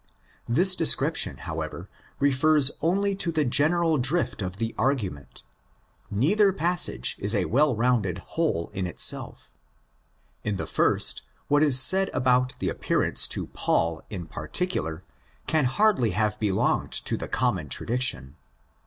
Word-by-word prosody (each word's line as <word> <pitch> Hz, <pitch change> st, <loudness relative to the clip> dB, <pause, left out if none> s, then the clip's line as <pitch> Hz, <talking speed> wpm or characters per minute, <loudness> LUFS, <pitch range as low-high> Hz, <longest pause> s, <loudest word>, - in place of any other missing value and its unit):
This 180 Hz, +10 st, +4 dB
description, 165 Hz, -, +2 dB
however, -, -, -7 dB, 0.3 s
refers 140 Hz, +1 st, +3 dB
only 200 Hz, +4 st, 0 dB
to 175 Hz, -3 st, -1 dB
the 155 Hz, -2 st, 0 dB
general 155 Hz, +4 st, +2 dB
drift 135 Hz, +1 st, -1 dB
of 95 Hz, 0 st, -5 dB
the 115 Hz, +1 st, -3 dB
argument. 105 Hz, -, -3 dB, 0.7 s
Neither 195 Hz, -, +2 dB
passage 175 Hz, -1 st, +1 dB
is 105 Hz, +3 st, +2 dB
a 95 Hz, -3 st, 0 dB
well 140 Hz, +1 st, +1 dB
rounded 110 Hz, -6 st, 0 dB, 0.2 s
whole 155 Hz, -, -2 dB
in 95 Hz, -3 st, -3 dB
itself. 90 Hz, -, +1 dB, 0.9 s
In 105 Hz, -1 st, -2 dB
the -, -, -4 dB
first, -, -, +1 dB, 0.3 s
what 145 Hz, 0 st, +3 dB
is 140 Hz, -4 st, +6 dB
said 190 Hz, +8 st, +6 dB
about 125 Hz, 0 st, +1 dB
the -, -, -3 dB
appearance -, -, 0 dB
to -, -, -2 dB
Paul 80 Hz, -1 st, -1 dB
in 90 Hz, -5 st, -7 dB
particular 80 Hz, -, -4 dB, 0.4 s
can 155 Hz, -3 st, 0 dB
hardly 180 Hz, -, +1 dB
have 105 Hz, -1 st, -1 dB
belonged 100 Hz, -3 st, -1 dB
to -, -, -1 dB
the -, -, -5 dB
common -, -, -2 dB
tradition. 85 Hz, -, -1 dB
130 Hz, 135 wpm, -25 LUFS, 100-165 Hz, 0.9 s, is